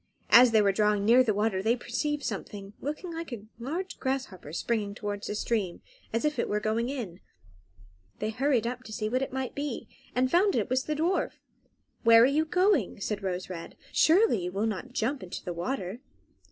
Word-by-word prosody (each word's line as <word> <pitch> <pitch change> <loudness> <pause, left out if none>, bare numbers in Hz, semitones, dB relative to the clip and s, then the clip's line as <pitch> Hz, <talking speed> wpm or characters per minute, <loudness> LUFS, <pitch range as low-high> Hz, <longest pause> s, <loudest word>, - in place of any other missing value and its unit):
As 245 +1 +9
they 220 -2 +4
were 200 - +4
drawing 210 0 +2
near 240 +4 +7
the 230 - +1
water 205 -2 0
they 225 +4 +2
perceived 290 +5 -2
something, 200 -1 -5
looking 305 +5 -4
like 330 -2 -6
a 220 -4 -6
large 335 +10 -4
grasshopper, 260 - -3
springing 205 +3 -1
towards 205 -1 -4
the 210 - -3
stream, 210 -5 -1 0.3
as 230 +5 0
if 300 -4 0
it - - 0
were 210 - +1
going 220 +3 0
in. 220 -11 -5 1.0
They 215 +1 -2
hurried 250 -1 +1
up 250 +1 -3
to 220 - -9
see 215 0 -2
what 255 +3 0
it 270 - -2
might 260 -1 -3
be, 285 -3 -4 0.3
and 255 +1 +2
found 385 +3 +4
that - - +3
it - - -2
was 260 +1 +1
the 305 - -1
dwarf. 340 +5 0 0.7
"Where 230 0 +7
are - - +8
you 295 +4 +2
going?" 360 - +2
said 205 +1 -3
Rose 185 -1 -3
Red. 170 -3 -7 0.2
"Surely 325 - +4
you 180 - -3
will 200 +4 -1
not 225 +4 -3
jump 255 +3 -1
into 180 -1 -7
the 175 - -3
water?" 190 +3 -3
230 Hz, 205 wpm, -28 LUFS, 205-275 Hz, 1.0 s, As